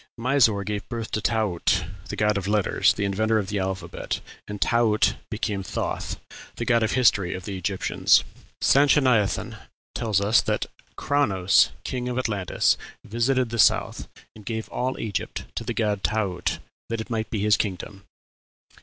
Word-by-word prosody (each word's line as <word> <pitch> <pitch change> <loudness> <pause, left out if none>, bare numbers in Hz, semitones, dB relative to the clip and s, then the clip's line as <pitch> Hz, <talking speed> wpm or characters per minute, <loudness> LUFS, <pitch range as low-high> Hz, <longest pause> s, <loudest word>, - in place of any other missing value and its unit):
Misor 115 -5 +3
gave 105 0 -4
birth 115 -2 -5
to 110 - -1
Taaut, 100 -5 +1 0.2
the - - -3
god 105 0 +2
of 100 -1 -2
letters, 105 -1 +3
the 100 - -1
inventor 110 +3 +1
of 100 -2 -2
the 105 -1 -1
alphabet, 95 -2 -3 0.3
and 105 -1 -6
Taaut 110 -4 +3 0.2
became 105 -2 -2
Thoth, 95 - -4 0.4
the 115 - -4
god 115 -1 +3
of 110 - +1
history 110 -7 +3
of 95 0 -8
the 100 - -4
Egyptians. 95 +1 +2 0.4
Sanchoniathon 130 -7 +3 0.4
tells 110 -4 0
us 105 +3 +4
that - - -1 0.3
"Chronos 100 -10 +3
(king 125 -1 -3
of 125 - -3
Atlantis) 105 -7 +1 0.3
visited 120 +2 0
the 115 - -3
South, - - +3 0.3
and 110 - -13
gave 110 +1 -4
all 130 +1 -2
Egypt 105 -4 -4
to - - -4
the - - -4
god 105 -3 0
Taaut, 95 -5 -1 0.3
that 115 -1 -2
it 110 - -6
might 110 -1 -2
be 105 -3 -2
his 105 -1 +5
kingdom." 95 -2 -4
105 Hz, 160 wpm, -25 LUFS, 100-115 Hz, 0.4 s, his